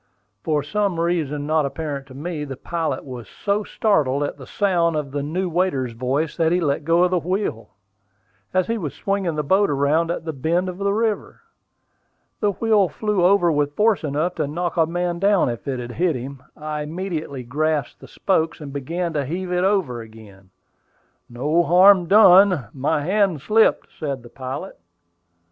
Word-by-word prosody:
For 150 -2 0
some 200 +1 -1
reason 155 -4 -1
not 155 0 +2
apparent 140 -1 -4
to 130 - -13
me, 155 +1 -4
the 135 -3 -7
pilot 160 -5 -3
was 125 -4 -8
so 205 +1 -1
startled 145 -12 +1
at 145 - -3
the 130 - -11
sound 175 -5 +1
of 150 -3 -3
the 145 +1 -2
new 175 +6 -2
waiter's 165 -8 0
voice 130 +6 -1
that 165 -1 +2
he 175 - +2
let 145 -3 0
go 170 +3 +3
the 180 0 0
wheel, 170 - -3 0.8
as 185 -1 +2
he 230 0 -2
was 150 -7 -5
swinging 195 -5 -1
the 150 - -1
boat 190 +7 +3
around 145 +4 +1
at 170 -1 -4
a 160 - -2
bend 170 +7 0
of 180 +1 -8
the 200 0 +1
river. 220 0 -2 1.0
The 205 -2 +1
wheel 210 -2 +2
flew 210 -4 -1
over 180 -2 +4
with 145 -1 0
force 215 -3 +2
enough 155 +4 -1
to 155 -3 -1
knock 170 +4 -3
a 165 -2 +3
man 175 0 -2
down 200 -6 +3
if 120 +3 -6
it 130 -2 -2
had 120 0 -6
hit 170 +3 0
him. 130 +2 -7 0.2
I 150 0 -4
immediately 155 -4 -5
grasped 150 +2 -1
the - - -13
spokes, 165 -4 -1
and 145 -3 -8
began 165 +5 -3
to 145 -2 0
heave 180 +6 -4
it 180 0 +1
over 185 - 0
again. 110 -4 -15 0.8
"No 145 +8 +1
harm 180 +1 +6
done; 190 - +6
my 145 +3 -1
hand 190 -1 +1
slipped," 215 +8 +2
said 140 -5 -4
the 120 - -13
pilot. 135 +9 -7
160 Hz, 180 wpm, -22 LUFS, 140-185 Hz, 1.0 s, harm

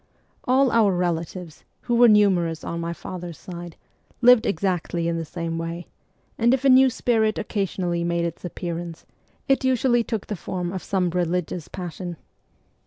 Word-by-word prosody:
All 260 0 +3
our 215 -4 +4
relatives, 175 -1 -3 0.2
who 240 - -2
were 240 +1 +7
numerous 185 -7 +3
on 170 - -4
my 170 0 -3
father's 175 -1 -7
side, 175 -2 -9 0.4
lived 245 -2 +6
exactly 175 -2 -1
in 170 0 -1
the 165 - -3
same 165 0 -4
way: 165 +1 -5 0.5
and 235 +3 +4
if 265 +1 -6
a - - +6
new 260 +1 +7
spirit 225 -3 +1
occasionally 185 -5 -2
made 170 0 0
its 170 -1 -5
appearance, 170 -1 -6 0.4
it 270 -1 +2
usually 250 -2 +2
took 225 -3 -4
the 210 - -4
form 180 0 -4
of 190 - -4
some 185 -3 0
religious 175 -1 -2
passion. 175 -1 -6
180 Hz, 160 wpm, -24 LUFS, 170-220 Hz, 0.5 s, were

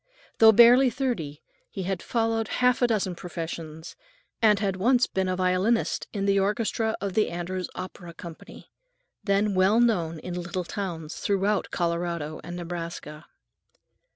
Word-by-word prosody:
Though 220 0 +9
barely 240 +4 +7
thirty, 230 - -3 0.3
he 195 - -5
had 185 -1 -2
followed 225 -2 0
half 250 +2 +2
a 245 - +5
dozen 205 -5 0
professions, 165 -2 -7 0.5
and 215 -2 +5
had 200 -2 -1
once 245 +5 +3
been 190 -1 -2
a 185 - 0
violinist 185 +5 +1
in 200 -2 -2
the 200 0 +3
orchestra 220 +2 0
of 195 -1 -3
the 215 - +2
Andrews 180 +2 -4
Opera 175 -2 -8
Company, 170 -2 -11 0.5
then 200 0 +1
well 190 +4 +4
known 175 -9 +1
in 175 +3 -7
little 175 +1 -4
towns 170 -5 -5
throughout 200 +1 0
Colorado 170 -3 -2
and 175 - -7
Nebraska. 170 -3 -7
190 Hz, 145 wpm, -26 LUFS, 170-220 Hz, 0.5 s, Though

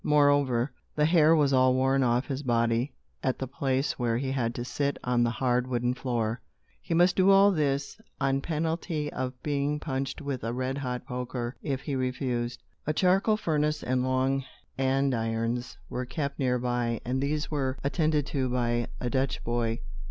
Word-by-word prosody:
Moreover, 145 -4 +3 0.2
the 150 - +3
hair 160 -1 +5
was 145 -3 +3
all 130 0 +5
worn 135 +1 +2
off 125 0 +2
his 135 -1 -3
body 115 0 +1 0.3
at 130 - 0
the 130 - -3
place 135 +1 -1
where 115 -2 +1
he 130 +1 -2
had 120 -3 -1
to 120 - -4
sit 140 +2 -1
on 125 -1 +2
the 120 - +3
hard 125 0 0
wooden 125 -1 0
floor. 120 -3 -2 0.4
He 165 - -2
must 175 +2 +4
do 190 0 +4
all 195 +1 +7
this, 145 +2 -1 0.2
on 135 0 +1
penalty 160 -1 -2
of 125 0 -4
being 145 0 0
punched 135 -2 -3
with 140 -4 -4
a 115 +1 -2
red 130 +2 -2
hot 125 -2 -4
poker, 125 -1 -4
if 135 -3 -2
he 145 - -4
refused. 125 -2 -2 0.2
A 155 - +2
charcoal 195 +6 +3
furnace 150 -5 0
and 130 0 +1
long 130 +1 +1 0.3
andirons 120 -3 0
were 125 0 -4
kept 140 +1 -3
near 125 -2 +2
by, 120 -1 -1
and 130 +2 -1
these 150 +3 -1
were 135 -3 -1
attended 150 0 +1
to 135 -3 -1
by 120 -1 0
a 125 - -2
Dutch 130 +1 -1
boy. 115 -1 -1
130 Hz, 175 wpm, -28 LUFS, 125-145 Hz, 0.4 s, all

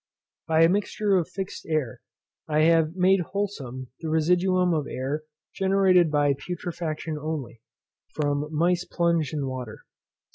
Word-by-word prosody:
By 160 0 +4
a - - +7
mixture 205 +1 +1
of 175 -3 +1
fixed 190 0 -6
air 155 -6 -2 0.5
I 155 0 +2
have 165 0 +3
made 190 +1 +4
wholesome 150 -10 -4
the 160 - -4
residuum 180 +3 +2
of 150 -3 -1
air 135 +4 -3 0.3
generated 190 -3 +3
by 145 -1 +2
putrefaction 165 -1 -5
only, 145 -7 -5 0.5
from 145 -1 0
mice 175 +3 +1
plunged 170 -5 0
in 145 -3 -2
water. 130 -4 -6
160 Hz, 135 wpm, -25 LUFS, 150-180 Hz, 0.5 s, a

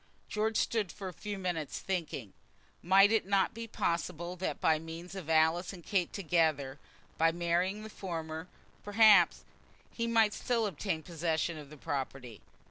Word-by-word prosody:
George 220 +1 0
stood 215 -6 0
for 195 -2 -7
a - - -10
few 205 +3 -5
moments 175 -6 -3
thinking. 160 - -4 0.5
Might 195 +3 +6
it 220 -4 +2
not 195 -1 +2
be 230 +1 -6
possible 170 -2 -2
that 185 - -3
by 155 -1 +3
means 165 +3 -8
of 185 -5 -7
Alice 160 +4 +3
and 175 -3 -11
Kate 190 -4 0
together, 155 -7 0 0.4
by 165 0 +5
marrying 175 +4 0
the 220 - -8
former, 165 -3 -5 0.4
perhaps, 205 -4 +5 0.5
he 230 0 -2
might 225 -2 +3
still 235 -3 0
obtain 180 -3 -2
possession 165 0 -1
of 150 -2 -10
the 150 - -12
property? 135 -6 -5
175 Hz, 155 wpm, -32 LUFS, 160-200 Hz, 0.5 s, Might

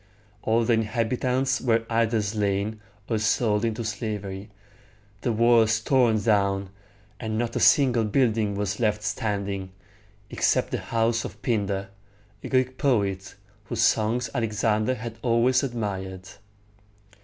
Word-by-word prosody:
All 115 +1 +1
the 120 - +3
inhabitants 125 +4 0
were 115 -2 +1
either 115 -1 +1
slain 105 +1 -1 0.3
or 110 -2 0
sold 110 -1 +1
into 115 0 -1
slavery, 105 -2 -5 0.7
the 120 - 0
walls 115 -1 +4
torn 120 -2 +3
down, 100 -2 +1 0.5
and 110 -1 -3
not 120 0 -2
a - - 0
single 125 -5 +4
building 110 -3 +1
was 100 0 -2
left 105 -2 0
standing, 100 -2 -3 0.6
except - - +1
the - - -1
house 115 0 0
of - - -8
Pin´dar, 100 -4 -1 0.5
a - - -6
Greek 130 0 0
poet, 100 -9 0 0.3
whose 115 +2 -2
songs 115 +2 +2
Alexander 110 +1 0
had 115 -1 -7
always 125 +2 +3
admired. 95 -7 -4
110 Hz, 125 wpm, -25 LUFS, 105-120 Hz, 0.7 s, walls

